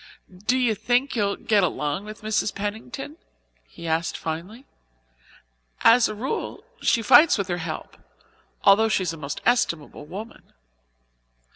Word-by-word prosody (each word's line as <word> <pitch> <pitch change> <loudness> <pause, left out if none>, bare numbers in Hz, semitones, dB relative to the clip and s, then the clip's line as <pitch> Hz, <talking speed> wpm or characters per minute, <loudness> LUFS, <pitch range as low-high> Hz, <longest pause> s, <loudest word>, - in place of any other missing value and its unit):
"Do 255 - +3
you 245 -3 +2
think 245 +6 0
you'll 200 -3 +1
get 210 -2 +2
along 150 +1 -1
with 215 0 -10
Mrs. 215 -1 0
Pennington?" 205 - -5 0.5
he 170 - -12
asked 165 +1 -1
finally. 180 - -6 1.2
"As 230 0 +6
a 215 - -5
rule 260 - -4 0.2
she 230 - +2
fights 265 +7 +7
with 200 -2 -2
her 175 - -1
help, 165 -2 -6 0.7
although 220 +3 +5
she 200 - +1
is 170 -2 -2
a - - -8
most 145 -1 -6
estimable 165 -11 0
woman." 210 +7 -10
210 Hz, 140 wpm, -24 LUFS, 170-230 Hz, 1.2 s, fights